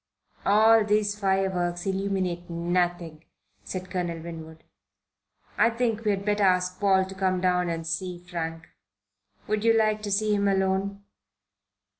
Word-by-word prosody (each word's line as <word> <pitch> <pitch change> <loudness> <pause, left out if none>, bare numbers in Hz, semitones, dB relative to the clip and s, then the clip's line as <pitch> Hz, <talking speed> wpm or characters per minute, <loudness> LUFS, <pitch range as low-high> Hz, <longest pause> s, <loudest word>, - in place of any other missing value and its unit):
"All 220 +2 +6
these 210 0 +1
fireworks 190 -3 0
illuminate 190 -3 -2
nothing," 170 -1 -1 0.4
said 185 - -6
Colonel 175 -3 -2
Winwood. 160 -1 -9 1.0
"I 230 - +5
think 230 -1 -1
we 215 - +1
had 200 -1 -1
better 210 0 +1
ask 180 -1 +2
Paul 190 -2 +3
to 190 - -9
come 190 -1 0
down 180 -1 +1
and 165 -1 -3
see 180 +2 -3
Frank. 165 -2 -6 0.8
Would 215 0 -1
you 230 0 +5
like 215 -1 +2
to 210 - -4
see 210 +1 +2
him 200 -1 +1
alone?" 195 +1 0
190 Hz, 140 wpm, -26 LUFS, 175-205 Hz, 1.0 s, All